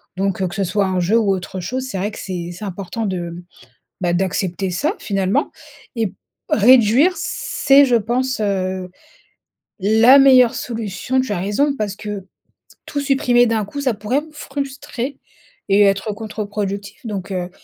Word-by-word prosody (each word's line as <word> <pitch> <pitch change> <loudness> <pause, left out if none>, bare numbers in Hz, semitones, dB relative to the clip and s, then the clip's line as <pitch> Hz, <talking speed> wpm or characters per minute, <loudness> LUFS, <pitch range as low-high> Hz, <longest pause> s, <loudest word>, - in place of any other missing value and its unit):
donc 195 0 -1
que 175 - -7
ce 195 - 0
soit 200 +3 +1
un 185 -1 0
jeu 205 +7 +2
ou 205 -4 +2
autre 185 0 -5
chose 255 +8 -3
c'est 215 - -4
vrai 205 +3 -2
que - - -9
c'est 175 -3 -5
c'est 180 +5 -8
important 200 +4 -4
de, 175 -2 -4 0.6
bah, 175 -1 +1
d'accepter 185 +1 -1
ça 290 - 0
finalement 195 +7 0 0.5
et 225 -5 -1 0.4
réduire 250 - +5
c'est 275 +1 +3
je 250 -3 +2
pense, 245 +4 -1
heu, 185 -2 -1 0.9
la 225 +7 +6
meilleure 255 -3 +6
solution. 230 +2 -2
Tu 255 -5 -3
as 200 - -1
raison 275 +10 +1
parce 205 -4 -3
que 205 -3 -6 0.6
tout 290 - -4
supprimer 260 -3 +3
d'un 225 -2 0
coup 285 +8 -6
ça 255 -4 +1
pourrait 215 +8 -1
me 310 - -14
frustrer 275 -2 -5 0.5
et 200 +1 +5
être 200 +1 +2
contre-productif 205 +1 -5
donc 195 -2 -5
heu, 180 -1 -3
210 Hz, 160 wpm, -19 LUFS, 190-255 Hz, 0.9 s, la